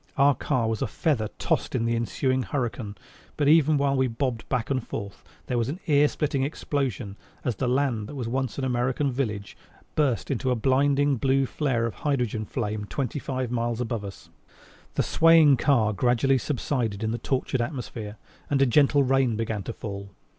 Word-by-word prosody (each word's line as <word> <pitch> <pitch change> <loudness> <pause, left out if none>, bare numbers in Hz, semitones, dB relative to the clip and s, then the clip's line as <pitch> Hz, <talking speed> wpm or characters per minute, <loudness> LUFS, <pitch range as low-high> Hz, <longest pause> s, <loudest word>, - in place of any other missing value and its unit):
Our 140 +1 +5
car 125 -3 -1
was 110 -1 -2
a - - +1
feather 135 -10 0
tossed - - -1
in 115 -2 +1
the 115 0 +1
ensuing 130 +3 0
hurricane, 120 -6 -3 0.4
but 145 - +1
even 155 -1 +5
while 140 -1 +2
we 130 -1 +2
bobbed 120 -1 -3
back 120 +1 -1
and 130 -3 0
forth 100 -4 -7 0.2
there 125 - -1
was 115 - 0
an 160 +6 -4
ear 145 -1 +4
splitting 145 -2 -1
explosion 135 -7 -2 0.3
as 120 - -1
the 130 - -1
land 125 -5 0
that 145 - -8
was 125 -4 -3
once 130 +1 -2
an 140 - -2
American 130 +2 0
village 105 -6 -3 0.4
burst 135 -9 0
into 130 0 -1
a 125 - +2
blinding 140 +3 +2
blue 135 +2 +2
flare 130 -4 0
of 115 - -3
hydrogen 125 -7 0
flame 105 -2 -3
twenty 140 +6 -3
five 130 -3 -3
miles 120 -1 -1
above 115 -3 -2
us. 100 -1 -10 0.6
The - - +2
swaying 165 -2 +6
of 135 - +5
the - - -3
car 115 -7 +3
gradually 125 +4 +2
subsided 120 -5 -2
in 110 - 0
the 120 - -3
tortured 130 0 -1
atmosphere, 120 -5 -5 0.3
and 140 - +2
a 135 - +5
gentle 140 +2 +4
rain 135 -3 +2
began 110 -2 -2
to 115 - -5
fall. 100 -2 -7
125 Hz, 190 wpm, -26 LUFS, 115-140 Hz, 0.6 s, swaying